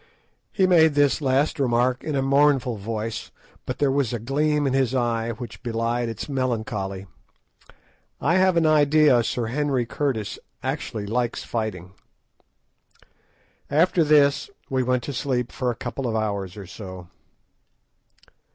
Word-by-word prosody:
He 190 - +2
made 160 -5 +5
this 145 +1 +3
last 140 +3 +1
remark 125 -1 +1
in 155 - -2
a 135 - +1
mournful 135 -3 +3
voice, 110 +2 -4 0.4
but - - -3
there 145 -2 +2
was 135 -4 +1
a - - 0
gleam 145 +5 0
in 135 - +1
his 135 -1 +1
eye 115 -2 0
which 120 +1 -9
belied 115 0 -1
its 115 -1 -6
melancholy. 110 -8 -2 1.1
I 170 +5 +2
have 185 -2 +3
an 165 - +3
idea 150 -4 +5
Sir 120 +1 -2
Henry 135 0 0
Curtis 115 -4 -2 0.2
actually 105 -2 -3
likes 120 +3 -1
fighting. 105 -6 -4 1.8
After 165 +3 +3
this 145 - +3 0.2
we 130 -1 +1
went 125 -1 0
to 140 - -5
sleep 125 -2 -1
for 125 -2 -2
a 120 - -2
couple 135 +2 -4
of 115 - -2
hours 100 -3 -2
or 100 - -7
so. 95 -2 -9
125 Hz, 140 wpm, -24 LUFS, 115-145 Hz, 1.8 s, made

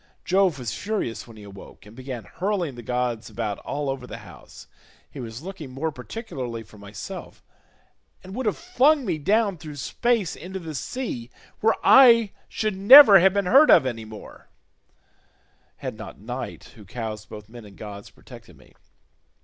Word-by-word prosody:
Jove 185 -4 +2
was 120 -6 -4
furious 205 - -4
when 115 -2 -14
he 105 - -12
awoke, 100 0 -13
and 105 +2 -15
began 130 -3 -7
hurling 185 -6 -3
the 120 - -10
gods 120 -1 -3
about 110 -3 -4
all 145 0 -4
over 135 -2 -4
the - - -8
house; - - -14 0.4
he - - -11
was 120 +2 -8
looking 180 -6 -8
more 145 +5 -3
particularly 125 - -7
for 105 -1 -17
myself, 100 0 -9 0.8
and 190 - -10
would 255 +1 -3
have 210 - 0
flung 310 -5 +2
me 155 - -2
down 200 +2 +1
through 155 -3 -9
space 225 - -1
into 190 +3 -8
the 165 -4 -7
sea 140 - -5 0.3
where 225 +1 +3
I 230 -6 +7 0.2
should 215 -3 -2
never 205 +1 +9
have 190 +2 +4
been 200 -1 +1
heard 275 +11 +6
of 155 - +7
any 115 -3 -4
more, 110 -1 -12 1.3
had - - -7
not - - -9
Night - - -7
who 110 - -14
cows 110 0 -6
both 105 -1 -11
men 120 +1 -12
and 100 -2 -15
gods 100 -1 -9
protected - - -15
me. - - -21
145 Hz, 170 wpm, -24 LUFS, -, 1.3 s, never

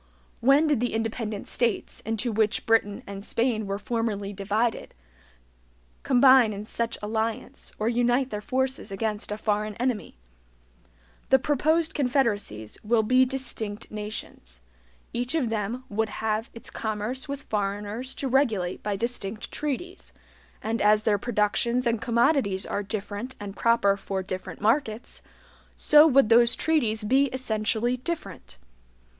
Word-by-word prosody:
When 275 +5 +5
did 295 -6 +2
the 245 -1 -1
independent 225 -2 -3
states, 235 -4 -1
into 225 +2 -2
which 215 0 +1
Britain 225 -3 +2
and 200 0 -7
Spain 230 -2 0
were 195 0 -2
formerly 210 -2 -2
divided, 210 +4 -1 1.1
combine 255 -3 +5
in 205 +1 -6
such 230 +1 -2
alliance, 220 +1 -3
or 215 - -1
unite 245 +2 +2
their 210 -1 -3
forces 260 -1 -2
against 210 +1 -3
a 210 - -2
foreign 210 -1 -1
enemy? 245 - -2 1.1
The 265 - +7
proposed 310 +4 +1
confederacies 230 - -1
will 220 +1 +2
be 255 +4 +4
DISTINCT 235 -5 -4
NATIONS. 210 - -7 0.5
Each 245 +5 -1
of 270 -8 +1
them 225 +3 -3
would 220 0 -1
have 220 +1 -2
its 230 - -7
commerce 225 +6 -3
with 280 0 -4
foreigners 205 +4 -2
to 275 - -3
regulate 225 -9 +1
by 205 -1 -2
distinct 215 -1 -4
treaties; 300 +6 -5 0.5
and 225 +2 -1
as 210 +1 +4
their 205 -2 +2
productions 235 +3 +1
and 230 -2 +1
commodities 235 -5 +2
are 200 - -2
different 205 +4 -5
and 205 -1 -7
proper 230 -4 +3
for 195 -1 -4
different 185 -1 -6
markets, 225 0 0 0.5
so 300 +1 +6
would 275 -6 +4
those 235 +1 +6
treaties 235 -10 +1
be 265 +6 +3
essentially 240 -2 -1
different. 220 - -6
225 Hz, 135 wpm, -26 LUFS, 210-255 Hz, 1.1 s, The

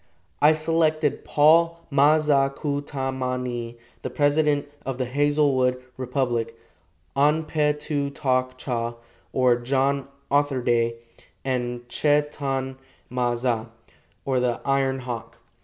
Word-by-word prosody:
I 150 +2 +7
selected 155 -1 +1
Paul 165 +3 +4
Ma 145 +3 +5
za 145 -3 +3
ku 145 0 -3
ta 135 -2 -3
ma 130 -1 -2
ni, 120 -2 -4 0.2
the - - -4
president 145 +2 +2 0.2
of 135 -2 -4
the 130 - -1
Hazelwood 135 -1 +2 0.2
Republic, 120 -3 -2 0.6
An 150 +3 +3
pe 150 -1 +1
tu 150 -1 -2
tok 130 -2 -1
cha, 120 -2 -3 0.4
or 125 -2 +3
John 135 +3 0 0.2
Otherday, 125 -5 +2 0.5
and 120 -2 -2
Che 145 +3 +2
tan 135 -2 -3 0.3
ma 125 -1 0
za, 120 -2 -1 0.6
or 130 -2 +1
the 125 -1 0
Iron 135 -1 +1
Hawk. 115 -2 -6
135 Hz, 125 wpm, -24 LUFS, 125-145 Hz, 0.6 s, I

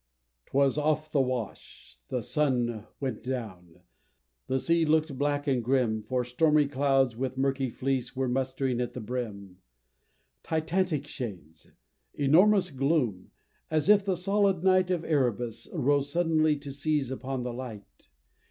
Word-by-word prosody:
'Twas 140 +1 +2
off 155 +1 0
the 145 - +3
Wash 110 - -5
the 125 - -3
sun 120 -6 0
went 130 -6 -3
down 95 -9 -6 0.7
the 130 - +1
sea 165 +5 +2
look'd 155 -2 +2
black 145 +1 0
and 130 -4 +1
grim, 120 -3 +1
For 125 +3 -1
stormy 150 +4 +3
clouds, 135 -3 +2
with 130 +2 -3
murky 135 -1 0
fleece, 130 +1 -2
were 130 0 0
mustering 130 0 -1
at 120 - -3
the - - -6
brim; 105 -5 -5 0.8
Titanic 160 -1 -1
shades! 90 - -8 0.5
enormous 180 +8 +4
gloom! 135 - 0 0.4
as 155 +4 0
if 205 -1 +6
the 195 -2 0
solid 195 0 +1
night 185 -1 +4
Of 175 -3 -1
Erebus 120 -6 -1
rose 145 -2 +1
suddenly 155 -3 +2
to 140 -1 -8
seize 145 -2 -1
upon 130 -1 -4
the 125 -1 -4
light! 115 - -9
135 Hz, 140 wpm, -28 LUFS, 125-155 Hz, 0.8 s, if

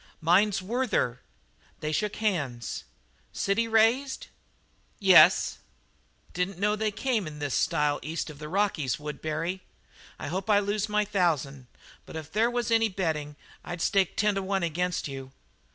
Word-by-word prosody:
"Mine's 190 +4 +3
Werther." 210 - 0 0.6
They 155 - -3
shook 210 +6 -1
hands. 140 - -2 0.5
"City 215 +4 0
raised?" 230 +5 +2 0.7
"Yes." 190 -3 +6 0.7
"Didn't 180 +1 -2
know 210 +2 +1
they 215 0 0
came 220 -2 -1
in 150 -1 -8
this 145 -3 -3
style 145 +6 +1
east 160 0 -4
of 145 - -14
the 150 -1 -7
Rockies, 185 -8 0
Woodbury. 155 +4 -3 0.6
I - - -7
hope 190 +5 -3
I 210 - +6
lose 205 +1 0
my 210 0 +2
thousand, 150 -10 0 0.4
but - - -10
if 160 -1 -7
there 225 +5 +2
was 240 -1 -2
any 225 -1 +4
betting 160 -6 -2 0.3
I'd 175 0 -6
stake 195 +2 +1
ten 210 0 +3
to 195 - -1
one 190 -1 -1
against 175 +1 -1
you." 135 -1 -8
185 Hz, 150 wpm, -28 LUFS, 155-210 Hz, 0.7 s, Yes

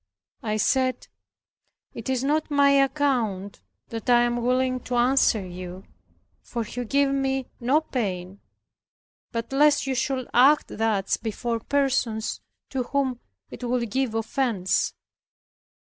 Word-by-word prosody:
I 215 -1 -1
said, 255 +4 +1 0.8
"It 230 - -6
is 260 -1 0
not 300 +3 +1
my 285 -1 +4
account 265 -8 +1 0.3
that 230 +2 -5
I 240 0 +6
am 240 0 0
willing 255 +1 +1
to 250 - -2
answer 240 -4 +3
you, 180 +1 -8 0.6
for 235 -2 -4
you 245 +3 -5
give 280 +4 +2
me 270 -1 0
no 265 +6 +3
pain, 195 - -4 0.9
but 230 +2 -4
lest 290 +1 +4
you 270 - -1
should 260 0 -1
act 275 +5 +5
thus 215 -3 +1
before 230 +1 -3
persons 260 -4 0 0.3
to 265 - -1
whom 260 -1 -1 0.3
it - - -9
would 240 -2 -1
give 260 -3 0
offence. 225 -4 0
245 Hz, 130 wpm, -25 LUFS, 225-270 Hz, 0.9 s, I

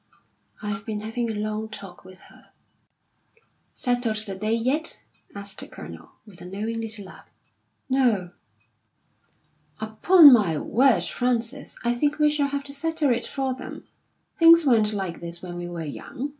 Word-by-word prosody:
"I've 205 -1 -3
been 210 0 -4
having 225 +2 -3
a 220 - -3
long 215 +1 -3
talk 200 -4 -10
with 185 0 -14
her." - - -18 1.3
"Settled 245 -3 0
the 195 - -4
day 215 +3 -1
yet?" 265 +8 -1 0.3
asked 200 -1 -6
the - - -6
Colonel, - - -11
with 200 -5 -14
a - - -8
knowing 215 +4 -4
little 220 -3 -5
laugh. 190 - -14 0.6
"No!" 240 -9 +1 1.5
"Upon 285 +8 +7
my 195 -10 +3
word, 255 - +3
Frances, 245 +2 -2
I 240 0 +2
think 290 +5 0
we 300 -1 +4
shall 295 -2 +1
have 280 0 -3
to 280 0 -10
settle 320 -1 0
it 235 0 -1
for 270 -2 -2
them. 260 - -9 0.5
Things 335 -2 +7
weren't 220 -5 +3
like 190 -5 -4
this 170 +1 -7
when 175 -1 -7
we 175 0 -5
were 170 -2 -5
young. 245 - -6
225 Hz, 155 wpm, -24 LUFS, 200-270 Hz, 1.5 s, Upon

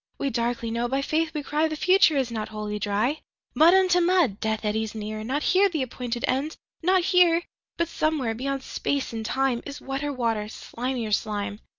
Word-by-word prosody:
13We 275 - -1
darkly 235 -1 -1
know, 235 +1 -1
by 265 +3 0
Faith 315 +2 0
we 295 - -2
cry,14The 310 +2 0
future 365 -3 +4
is 260 -3 0
not 215 -2 -4
Wholly 210 -1 -4
Dry.15Mud 250 - +1
unto 360 -1 +3
mud! 340 - +2
Death 220 0 -2
eddies 220 +1 -1
near 215 0 -5
16Not 265 +7 -2
here 395 +2 +4
the 315 -7 -1
appointed 245 -1 -3
End, 280 +5 -1 0.2
not 365 +1 +3
here!17But 345 -1 +1
somewhere, 310 -8 0
beyond 270 +3 -3
Space 280 -4 -2
and 225 -1 -4
Time.18Is 270 +3 -1
wetter 275 +2 -3
water, 230 -5 -1
slimier 235 +1 -4
slime! 205 -1 -2
260 Hz, 170 wpm, -25 LUFS, 220-315 Hz, 0.2 s, future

